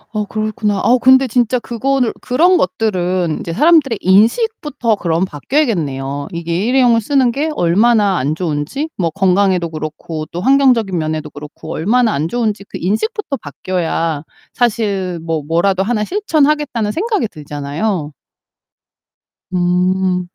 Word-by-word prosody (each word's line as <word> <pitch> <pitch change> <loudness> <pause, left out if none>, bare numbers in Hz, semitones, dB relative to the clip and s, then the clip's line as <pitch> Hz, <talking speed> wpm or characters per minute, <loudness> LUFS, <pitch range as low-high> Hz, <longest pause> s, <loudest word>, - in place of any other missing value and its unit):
어 210 -1 -1
그렇구나. 215 -1 -2
아 240 +4 +4
근데 260 +1 +6
진짜 245 +1 +1
그거를 250 +1 -1
그런 335 +9 +3
것들은 185 - -1
이제 165 - -5
사람들의 295 - +3
인식부터 235 - +2
그럼 170 0 0
바뀌어야겠네요. 145 - -2
이게 170 +3 -2
일회용을 245 -3 +3
쓰는 260 0 +2
게 295 +5 -1
얼마나 205 +2 +3
안 145 +4 -1
좋은지 170 - -3
뭐 170 -3 0
건강에도 185 -2 +1
그렇고 155 0 -6
또 170 - -4
환경적인 250 -7 +3
면에도 155 -1 -3
그렇고 150 +2 -9
얼마나 225 +6 +1
안 150 +3 -1
좋은지 215 -2 -2
그 - - -8
인식부터 280 - -2
바뀌어야 165 -1 -2 0.3
사실 200 -7 -1
뭐 165 -2 -2
뭐라도 185 +4 +1
하나 215 0 0
실천하겠다는 300 - 0
생각이 410 - -1
들잖아요. 150 +2 -4 1.4
음. 180 0 +1
200 Hz, 325 characters per minute, -16 LUFS, 170-250 Hz, 1.4 s, 근데